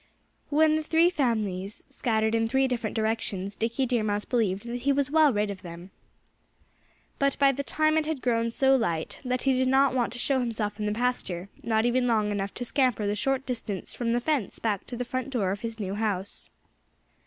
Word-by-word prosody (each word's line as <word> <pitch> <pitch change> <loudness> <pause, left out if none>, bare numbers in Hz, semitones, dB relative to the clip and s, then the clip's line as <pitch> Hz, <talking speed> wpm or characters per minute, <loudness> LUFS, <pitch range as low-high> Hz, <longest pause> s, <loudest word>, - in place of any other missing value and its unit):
When 310 +1 +4
the - - -1
three 325 +3 +3
families 215 - -1
scattered 220 -2 0
in 225 0 +2
three 265 +3 +2
different 235 -4 -3
directions 215 -3 -1
Dickie 230 +5 -1
Deer 240 -2 +1
Mouse 210 -1 -1
believed 210 -4 0
that 240 +1 -3
he 280 +3 +2
was 280 0 0
well 310 -2 +5
rid 210 -2 0
of 190 -2 -8
them. 175 +1 -10 1.3
But 275 0 +1
by 275 -1 +5
that 275 +1 -5
time 310 0 +2
it 305 - -3
had 315 -3 -2
grown 230 -2 +1
so 265 +3 +3
light 170 -11 -1
that 250 -1 -1
he 270 - +3
did 260 0 +2
not 265 0 +4
want 245 -2 0
to - - -7
show 265 +2 +1
himself 220 -4 -2
in 210 - -1
the - - 0
pasture, 210 -6 -2
not 220 -1 +1
even 245 +1 +2
long 215 -3 +2
enough 200 -1 -3
to 245 - -4
scamper 250 -5 +1
the 205 +1 0
short 270 +5 0
distance 220 -6 -4
from 240 -2 -2
the 235 +1 +2
fence 265 -5 -1
back 210 -4 -2
to 245 - -6
the 250 - -3
front 255 +2 -3
door 215 -8 0
of 200 - -3
his 230 0 -5
new 195 -2 -3
house. 205 -2 0
235 Hz, 210 wpm, -27 LUFS, 210-265 Hz, 1.3 s, well